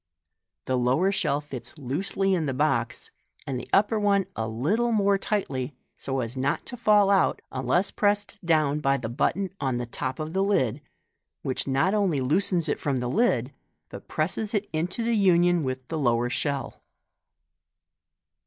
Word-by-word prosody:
The 130 -1 0
lower 130 +11 +2
shell 150 -7 0
tits 130 -2 -8
loosely 190 +8 0
in 165 -5 0
the 135 - -2
box, 130 -5 0 0.3
the 125 -3 -4
upper 210 +2 +3
one 200 -2 +2
a 110 - -2
little 170 - 0
more 200 -2 +3
tightly, 140 -11 -2 0.2
so 135 -1 -3
as 115 +1 -5
not 135 +2 -1
to 245 - -6
fall 210 -4 +4
out 195 - +3
unless 135 +10 +1
pressed 205 0 0
down 155 -3 +2
by 135 -2 +2
the 115 - -5
button 185 +10 0
on 130 -3 0
the 120 - -3
top 130 +2 -4
of 155 +1 -5
the 190 - +1
lid, 130 - +1 0.6
which 130 - -2
not 140 +8 +2
only 195 -9 +1
loosens 165 +5 +1
it 145 - -1
from 140 -2 -1
the 125 -1 -2
lid, 140 - +1 0.4
but - - -10
presses 200 +7 -1
it 205 0 -1
into 175 +8 -1
union 175 -6 +3
with 130 -2 -4
the 160 - -2
lower 120 -2 +1
shell. 140 +2 -2
155 Hz, 165 wpm, -26 LUFS, 130-200 Hz, 0.6 s, fall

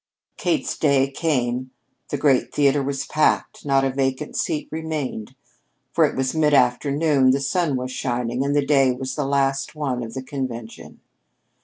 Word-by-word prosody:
Kate's - - -1
day 140 -2 +3
came. 130 -4 -1 0.4
The 145 - -2
great 135 -2 +2
theater 145 -1 +3
was 135 0 -3
packed 155 0 0
not 135 -1 +3
a 135 - 0
vacant 135 +2 -2
seat 150 - -1
remained. 150 -7 -4 0.6
For 160 +4 +4
it 145 - -2
was 130 -1 -1
mid 150 -2 +3
afternoon, 140 +2 +3
the 135 +2 +3
sun 155 +1 0
was 130 0 -3
shining, 125 0 -2
and 140 +1 0
the 145 -1 +2
day 135 -3 +4
was 130 +1 -5
the 145 -1 -2
last 135 0 0
one 135 -5 -2
of 115 0 -7
the 130 - -4
convention. 125 -4 -7
135 Hz, 165 wpm, -22 LUFS, 130-145 Hz, 0.6 s, For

